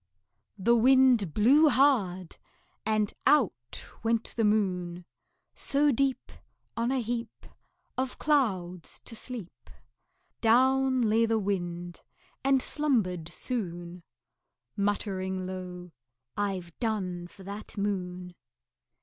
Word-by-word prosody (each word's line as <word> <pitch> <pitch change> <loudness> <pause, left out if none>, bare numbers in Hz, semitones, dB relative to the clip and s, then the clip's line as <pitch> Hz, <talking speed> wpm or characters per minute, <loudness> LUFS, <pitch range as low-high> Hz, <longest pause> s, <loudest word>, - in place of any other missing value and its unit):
The 235 +5 +3
Wind 250 -5 +5
blew 275 - +5
hard, 200 - +2 0.5
and 215 -1 +1
out 130 - +2 0.2
went 230 0 0
the 230 - +1
Moon. 180 -5 0 0.5
So 290 +1 +2
deep, 270 +1 0 0.4
On 235 +1 0
a 265 - +1
heap 235 0 -5 0.5
Of 260 -1 -2
clouds, 190 - 0
to 230 - -2
sleep, 215 - -7 0.7
Down 260 +2 +4
lay 225 +1 +3
the 225 0 +2
Wind, 175 -4 -3 0.4
and 270 -1 +3
slumbered 205 - 0
soon 175 -5 -4 0.7
Muttering 190 -2 -1
low, 180 -1 -7 0.4
"I've 190 -5 -3
done 185 -7 -2
for 190 +2 -15
that 200 +3 -8
Moon." 180 -3 -3
205 Hz, 100 wpm, -29 LUFS, 180-245 Hz, 0.7 s, Wind